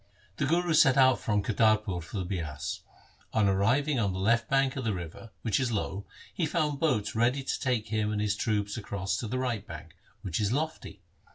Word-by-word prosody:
The 140 - 0
Guru 170 +2 +2
set 135 -3 +5
out 130 -1 +5
from 105 -2 0
Kartarpur 110 -4 +2
for 85 +6 -7
the 95 - -2
Bias. 80 -6 -4 0.5
On 110 -2 +3
arriving 120 +9 +2
on 100 -4 +1
the 95 - -4
left 115 +3 +2
bank 135 0 +2
of 135 - -3
the 110 -4 0
river, 85 +6 -8
which 110 -4 +1
is 130 -3 0
low, 100 -2 -3 0.3
he 165 - 0
found 150 -3 0
boats 105 -10 +1
ready 125 +4 +1
to - - -2
take 120 -4 -1
him 110 -1 0
and 105 - -1
his 105 -1 0
troops 105 -1 -1
across 100 -3 -3
to 115 - -3
the 130 - -2
right 120 -5 -1
bank, 80 -3 -10 0.3
which 85 -4 -2
is 105 -1 +1
lofty. 155 +4 -3
110 Hz, 205 wpm, -29 LUFS, 100-130 Hz, 0.5 s, set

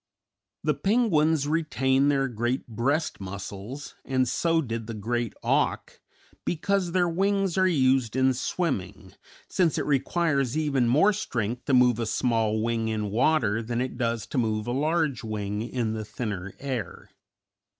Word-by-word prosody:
The 150 - +2
penguins 160 - +2
retain 140 -4 +2
their 135 -1 +2
great 120 +2 -2
breast 130 +8 -1
muscles, 100 +7 -7
and 130 -1 +1
so 165 +6 +1
did 115 -6 -3
the 115 - -5
Great 115 +2 -2
Auk, - - 0 0.4
because 180 +2 0
their 180 0 +2
wings 195 +1 +1
are 185 0 +4
used 130 - +2
in 130 0 +3
swimming, 100 - -3 0.3
since 175 -4 +1
it - - -1
requires 140 -1 +1
even 140 -6 +1
more 155 - +4
strength 120 - -3
to 135 - +3
move 125 -2 +4
a 115 - -1
small 110 -2 +1
wing 115 -1 0
in 105 -2 -2
water 115 -2 +2
than 115 +1 -3
it 130 0 -2
does 115 -2 -1
to 135 - -2
move 110 -2 0
a 120 - -2
large 150 -1 0
wing 105 -1 -3
in 115 -1 -2
the 110 -1 -3
thinner 100 -4 -5
air. 130 -9 -5
130 Hz, 150 wpm, -26 LUFS, 110-155 Hz, 0.4 s, are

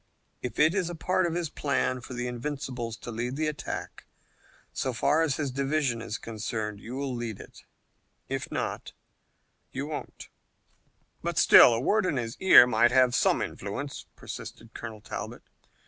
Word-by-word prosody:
If 125 - -5
it 155 +3 +5
is 185 -3 0
a 175 - -5
part 185 +2 +1
of 165 - -3
his 170 -3 -2
plan 130 -3 -1
for 125 - -8
the 120 0 -3
Invincibles 125 -2 -4
to 120 - -8
lead 120 +3 -3
the 155 +2 -1
attack, 150 -2 -5 0.7
so 130 - -2
far 145 +7 +2
as 155 -5 +1
his 145 -4 -2
division 135 -2 0
is 115 -1 -4
concerned, 110 -2 -4
you'll 130 +4 -4
lead 120 -4 -4
it. - - -13 0.6
If - - -4
not, - - -3 0.8
you 135 +2 -4
won't." 150 0 -7 0.9
"But - - -3
still - - +9
a 115 - +1
word 205 - +2
in 145 - 0
his 115 -1 -3
ear 190 -9 +9
might 120 0 +4
have 130 -1 +4
some - - +3
influence," - - -6
persisted 115 0 -9
Colonel 110 -2 -8
Talbot. - - -7
130 Hz, 160 wpm, -28 LUFS, 115-150 Hz, 0.9 s, still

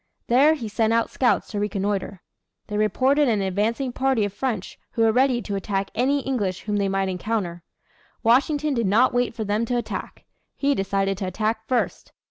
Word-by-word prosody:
There 280 +6 +5
he 240 -7 -5
sent 220 +1 +1
out 230 0 +1
scouts 250 - +1
to 205 - -2
reconnoitre. 200 -2 -2 0.4
They 210 - -6
reported 265 +7 +2
an 215 -4 +1
advancing 220 +7 -1
party 260 -5 +1
of 200 - -5
French 225 -6 -3
who 230 - +1
were 225 - +5
ready 250 0 +2
to 200 - -4
attack 195 0 -2
any 275 +5 +1
English 205 -9 -2
whom 210 -1 -2
they 200 -1 +1
might 195 0 0
encounter. 185 -2 -2 0.6
Washington 285 +5 +3
did 235 -5 0
not 225 +7 +4
wait 245 -1 0
for 225 - -3
them 210 +2 0
to 245 +1 -1
attack. 240 - -5 0.3
He 280 0 +2
decided 195 -3 -1
to 190 - -2
attack 220 +4 -2
first. 250 -2 -1
220 Hz, 185 wpm, -24 LUFS, 200-250 Hz, 0.6 s, There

